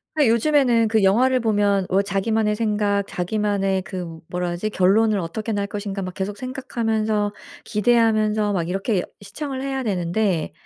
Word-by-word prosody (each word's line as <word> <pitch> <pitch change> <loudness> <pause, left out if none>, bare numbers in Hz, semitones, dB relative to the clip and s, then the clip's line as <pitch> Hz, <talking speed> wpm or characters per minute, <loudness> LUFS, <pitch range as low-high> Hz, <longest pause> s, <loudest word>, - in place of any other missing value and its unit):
아 295 -3 +3
요즘에는 235 -2 +3
그 220 -2 +2
영화를 255 +7 +4
보면 205 -4 +1
뭐 190 +2 +3
자기만의 210 +2 0
생각 210 -2 +1
자기만의 195 0 -1
그 175 -5 -7
뭐라 180 0 -2
하지 175 +5 -2
결론을 210 +2 +3
어떻게 210 +6 -4
날 200 -1 -1
것인가 200 -1 -4
막 185 -1 -5
계속 195 +2 -4
생각하면서 220 -5 -1 0.3
기대하면서 215 -1 +2
막 170 -4 -1
이렇게 195 +1 -1 0.2
시청을 265 +6 -5
해야 270 -1 -2
되는데 180 -3 0
210 Hz, 350 characters per minute, -22 LUFS, 195-225 Hz, 0.3 s, 영화를